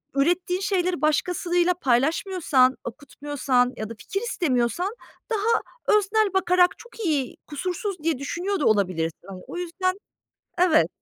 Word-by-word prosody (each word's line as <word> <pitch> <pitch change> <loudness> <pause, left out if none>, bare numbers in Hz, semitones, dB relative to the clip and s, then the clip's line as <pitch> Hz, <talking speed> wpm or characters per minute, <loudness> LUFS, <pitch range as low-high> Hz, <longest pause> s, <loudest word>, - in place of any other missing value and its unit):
ürettiğin 350 +5 +1
şeyleri 365 -3 0
başkasıyla 350 +3 +1
paylaşmıyorsan, 275 -1 +2
okutmuyorsan 260 0 -1
ya 215 0 -5
da - - -6
fikir 390 - -4
istemiyorsan 350 - 0 0.3
daha 450 0 +1 0.4
öznel 420 0 +1
bakarak 360 -1 +3
çok 475 - -15
iyi, 285 -6 0
kusursuz 365 +5 -3
diye 325 -3 +1
düşünüyor 355 +8 -2
da 295 - 0
olabilirsin, 180 -6 +1
hani. 190 -2 -9
O - - -7
yüzden, 370 +2 -2 0.6
evet. 340 - +4
345 Hz, 125 wpm, -24 LUFS, 260-370 Hz, 0.6 s, evet